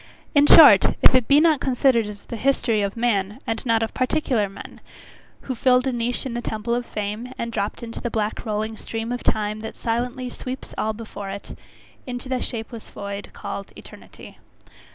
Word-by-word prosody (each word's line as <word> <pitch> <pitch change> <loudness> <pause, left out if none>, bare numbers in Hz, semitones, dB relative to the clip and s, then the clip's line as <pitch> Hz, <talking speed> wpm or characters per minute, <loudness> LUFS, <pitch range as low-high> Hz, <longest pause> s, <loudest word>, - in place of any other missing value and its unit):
In 290 0 +5
short, - - +8
if - - +8
it 255 -3 +3
be 285 +1 +6
not 315 -2 +4
considered 250 -4 +2
as 205 -1 -9
the - - -6
history 235 -3 +1
of 200 +2 -2
man; 210 -4 0
and 225 - -3
not 225 -1 +3
of 225 - -4
particular 255 -5 0
men, 195 - -11 0.6
who 260 - -4
filled 250 +1 +3
a 265 - +1
niche 240 +2 -2
in 260 - -4
the 240 - -3
temple 220 0 -3
of 240 0 -2
fame, 210 +4 -4
and 235 -1 -3
dropped 205 +1 -3
into 230 -1 -7
the 240 - -2
black 215 -1 -2
rolling 215 0 -3
stream 225 +2 -5
of 245 - -3
time, 210 0 0
that 220 - -7
silently 245 +2 -2
sweeps 255 +1 -7
all 220 0 -1
before 210 -3 -8
it, 200 +1 -7 0.5
into 245 0 -5
the 255 -1 -1
shapeless 225 -1 -6
void 200 0 -6
called 200 -1 -6
eternity. - - -13
230 Hz, 190 wpm, -23 LUFS, 215-250 Hz, 0.6 s, short